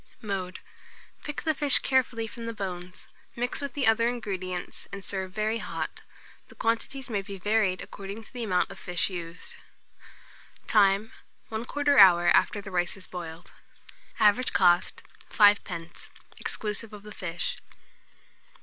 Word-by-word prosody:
Mode. 190 -3 -4 0.6
Pick 295 - -5
the 315 - +2
fish 285 -1 +4
carefully 250 -4 +1
from 230 +1 -8
the 230 - -4
bones, 180 -2 -6 0.3
mix 245 +3 -2
with 280 - -5
the 280 -3 +2
other 225 +1 +4
ingredients, 185 -7 -4
and 200 -1 -7
serve 190 -2 -3
very 215 +3 -1
hot. 210 - -5 0.5
The - - -16
quantities 230 +4 -1
may 210 -5 -1
be 195 0 -8
varied 205 -1 +1
according 200 +3 -8
to - - -15
the 245 -2 -3
amount 185 -3 +1
of 195 - -10
fish 180 +1 0
used. 170 -1 -6 1.1
Time. 200 0 +3 0.4
1/4 280 +5 +2
hour 175 -3 +8
after 205 - +3
the 195 -1 -9
rice 175 +1 0
is 190 - -11
boiled. 170 -1 -8 0.7
Average 215 +4 +4
cost, 175 -1 +3 0.3
5d., 185 -5 +2 0.3
exclusive 215 +1 -3
of 205 -1 -10
the 210 - -10
fish. 175 -3 -3
205 Hz, 140 wpm, -28 LUFS, 185-230 Hz, 1.1 s, hour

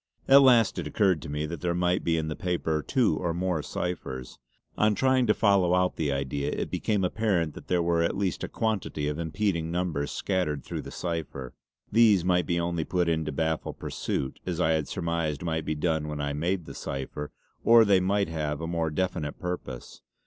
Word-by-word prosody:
At 140 +1 +8
last 125 -4 +5
it - - -3
occurred 95 -6 +2
to 80 - -8
me 75 +1 -2
that 80 0 -6
there 85 -1 0
might 90 0 +1
be 80 -1 +1
in 80 -1 -1
the 75 - -3
paper 85 -4 -1
two 110 - +1
or 85 0 -2
more 90 -3 0
ciphers. 65 -8 -5 0.4
On 105 0 +3
trying 130 0 +3
to 105 - +5
follow 95 -4 +3
out 90 0 +1
the 75 -3 -1
idea, 70 +1 -2
it - - -3
became 105 -3 0
apparent 90 -5 0
that - - -11
there 90 -1 +2
were 85 0 +2
at 85 - 0
least 95 -4 -1
a - - -1
quantity 105 -9 -2
of 75 +1 -2
impeding 85 0 -1
numbers 85 -4 -1
scattered 90 -7 -1
through - - -5
the - - -9
cipher. 80 -7 -4 0.4
These 105 -5 +5
might 90 -3 +2
be 85 0 +1
only 85 -1 -1
put 90 +1 0
in 80 -1 +1
to 75 - -2
baffle 80 +2 -1
pursuit, 65 - -4
as 90 -2 -3
I 80 -2 +3
had 80 -2 0
surmised 85 -2 -2
might 80 -2 -2
be 75 - -1
done 80 0 0
when 75 -1 -4
I 70 0 -1
made 85 +4 -1
the - - -8
cipher; 70 +2 -5 0.3
or 115 -1 +7
they 100 -2 +5
might 100 +1 +1
have 75 -3 -3
a 80 - -4
more 85 -1 -1
definite 75 -2 -2
purpose. 90 -8 -6
85 Hz, 205 wpm, -27 LUFS, 75-95 Hz, 0.4 s, At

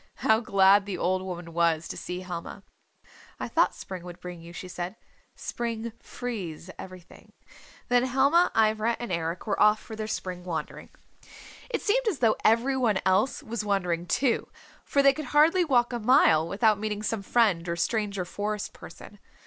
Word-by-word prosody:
How 220 0 +5
glad 200 -2 +4
the 195 - -3
old 185 +1 0
woman 175 -3 -7
was 165 -1 +1
to - - -6
see 180 +1 -5
Helma. 180 +2 -7 0.8
"I - - -3
thought - - +2
spring 185 -2 -7
would 175 -1 -10
bring 180 -1 -8
you," 170 +1 -11
she 180 +1 -8
said. 180 +2 -5 0.4
"Spring 230 -1 -4
frees 190 -8 -6
everything." 185 -2 -12 0.5
Then 245 0 +3
Helma, 280 +7 +3
Ivra 220 +1 +2
and 240 -5 -5
Eric 170 0 -3
were 205 -3 -1
off 210 0 +5
for 220 - -9
their 215 0 -4
spring 185 -4 -4
wandering. 175 -3 -5 0.8
It 475 - -3
seemed - - +1
as 390 -9 +1
though 225 -4 +3
every 235 +5 +3
one 235 -6 +2
else 190 +8 +2
was 225 -1 -4
wandering, 180 -4 -1
too, 245 +2 +1 0.3
for 280 - +1
they 275 0 +6
could 305 0 -6
hardly 330 +5 +5
walk 245 -6 +2
a 240 - -2
mile 210 - +4
without 210 +3 +2
meeting 210 0 -3
some 215 0 -2
friend 195 -5 +2
or 170 - -1
stranger 200 +1 -1
Forest 205 +3 -4
Person. 200 +4 -13
210 Hz, 175 wpm, -27 LUFS, 180-235 Hz, 0.8 s, they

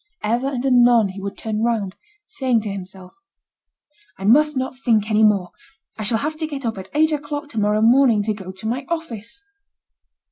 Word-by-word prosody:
Ever 240 +5 0
and 265 -2 -3
anon 240 -4 +5
he 195 +1 -8
would 200 0 -6
turn 215 -1 -3
round, 220 -5 -1 0.3
saying 260 - 0
to 210 -1 -4
himself: 190 -1 -9 1.0
"I 195 - -6
must 300 +6 +4
not 260 0 -3
think 220 -4 +1
any 215 0 +3
more; 200 -5 +2 0.4
I - - -8
shall 215 +2 +1
have 305 +6 -3
to 315 0 -3
get 280 -4 -6
up 225 -4 -2
at 190 - -10
eight 315 +1 +4
o'clock 290 0 -4
to 225 - -4
morrow 210 +1 +2
morning 235 -2 +4
to 215 +1 -1
go 190 -3 -8
to 190 +3 -8
my 250 +5 -2
office." 320 - -6
230 Hz, 190 wpm, -21 LUFS, 210-275 Hz, 1.0 s, anon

